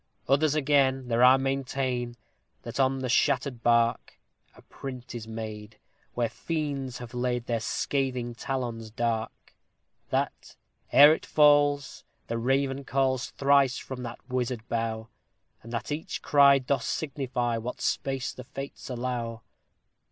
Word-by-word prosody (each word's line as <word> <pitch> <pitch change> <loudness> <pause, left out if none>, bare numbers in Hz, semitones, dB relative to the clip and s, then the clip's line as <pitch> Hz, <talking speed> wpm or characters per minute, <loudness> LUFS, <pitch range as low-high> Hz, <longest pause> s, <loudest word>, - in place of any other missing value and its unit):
Others, 145 +2 +3
again, 135 -3 +2
there 120 +1 +3
are 130 +1 +8
maintain 135 -2 -2 0.5
that 120 +3 -6
on 135 0 +3
the 130 - -2
shattered 130 0 +1
bark 115 0 +2 0.4
A - - -17
print 130 -2 -8
is 115 -2 -6
made, 110 -1 -7 0.4
where 120 -1 +1
fiends 140 0 -3
have 120 -1 -9
laid 125 -1 -1
their 115 -1 -1
scathing 125 +1 -1
talons 120 -3 -4
dark; 115 0 -3 0.6
That, - - -2 0.4
ere 145 +2 +9
it - - -4
falls, 145 -2 +3 0.2
the 115 0 -3
raven 135 +2 0
calls 130 -2 0
thrice 140 -2 +3
from 130 -1 -7
that 120 0 -8
wizard 125 -3 -2
bough; 115 -1 -2 0.5
And 115 - -11
that 120 +4 -4
each 150 +2 -4
cry 140 -1 +6
doth 135 0 -1
signify 125 -5 -2
what 120 +2 -5
space 135 -2 -1
the 125 - -9
Fates 135 +2 -8
allow. 120 -2 -3
125 Hz, 135 wpm, -27 LUFS, 120-135 Hz, 0.6 s, ere